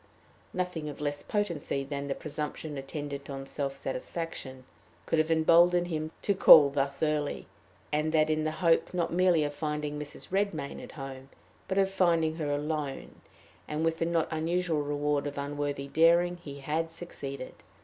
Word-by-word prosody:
Nothing 180 -4 -3
of 145 - -8
less 145 -1 -2
potency 170 -9 -1
than 140 0 -4
the 135 - -1
presumption 150 0 -5
attendant 140 0 -6
on 135 -1 -5
self 135 0 -3
satisfaction 135 -1 -5 0.4
could 165 - +1
have 155 +1 +2
emboldened 170 +2 +5
him 155 -1 -2
to 200 - +2
call 150 -6 +9
thus 140 +1 -1
early, 150 -2 0 0.5
and 150 +1 +1
that 155 -1 +4
in 155 0 +1
the 155 - +1 0.2
hope 165 +2 +3
not 170 -2 0
merely 175 -3 +4
of 145 0 -2
finding 150 0 -3
Mrs. 150 -1 -8
Redmain 190 -8 -1
at - - -10
home, 135 -2 -8 0.4
but 190 - -2
of 195 -1 +3
finding 165 -4 +2
her 155 -3 -2
alone; 145 -1 -3 0.5
and, 150 +2 -1
with 165 0 0
the 165 - +1
not 170 -2 +1
unusual 165 0 0
reward 145 0 0
of 145 - -6
unworthy 145 0 -3
daring, 170 +4 +4
he 140 -5 -9
had 160 +3 -1
succeeded. 140 -6 -7
155 Hz, 165 wpm, -29 LUFS, 145-165 Hz, 0.5 s, call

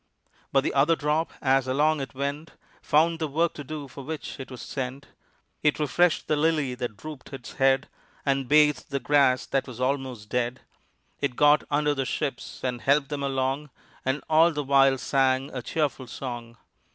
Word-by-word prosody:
But 135 -1 +3
the - - -1
other 145 +4 +4
drop 155 +2 0
as 135 -1 +3
along 150 +3 +2
it 135 - -7
went 140 +4 -4 0.3
Found 160 +2 +2
the 160 - -1
work 165 +4 +1
to 145 - -7
do 145 0 -6
for 140 +1 -10
which 155 0 -6
it 135 - -7
was 125 -3 -8
sent: 135 +1 -5 0.5
It 150 - +2
refreshed 160 +3 +2
the 155 - +2
lily 150 -3 +1
that 120 -4 -5
drooped 155 +3 -9
its 130 -3 -8
head, 135 0 +2 0.4
And 135 -2 +1
bathed 150 0 +4
the 140 - -1
grass 130 -1 +3
that 135 0 -1
was 125 -2 -9
almost 130 -4 -2
dead. 125 +2 -1 0.6
It 140 -3 -1
got 150 +2 +5
under 150 0 +2
the 135 -2 -2
ships 140 -1 -4
and 125 -2 -2
helped 140 0 +2
them 145 -1 -3
along, 135 +1 -1 0.3
And 130 +2 -1
all 160 +2 +5
the 150 -2 -3
while 135 -1 +4
sang 135 0 +1
a 125 - -3
cheerful 140 -1 -2
song. 120 -2 -7
140 Hz, 180 wpm, -26 LUFS, 130-150 Hz, 0.6 s, got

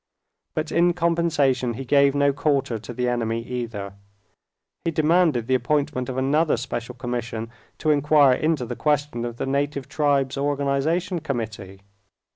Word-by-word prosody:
But 155 0 -2
in 175 +1 +3
compensation 160 -8 +1
he 135 +3 -6
gave 140 +1 +4
no 140 0 +3
quarter 135 -5 0
to 110 - -9
the 125 +1 -2
enemy 115 -1 -1
either. 115 -5 -5 0.9
He - - 0
demanded 160 -5 +2
the 130 - 0
appointment 140 -1 0
of 130 - -4
another 145 +3 +2
special 120 -1 -5
commission 120 -2 -4 0.3
to 155 - +1
inquire 145 -2 +5
into 155 -1 0
the 120 +1 -5
question 145 -5 0
of 120 -1 -6
the - - -2
Native 140 0 -1
Tribes 140 -3 +1
Organization 145 +6 0
Committee. 110 -9 -5
140 Hz, 145 wpm, -23 LUFS, 120-150 Hz, 0.9 s, inquire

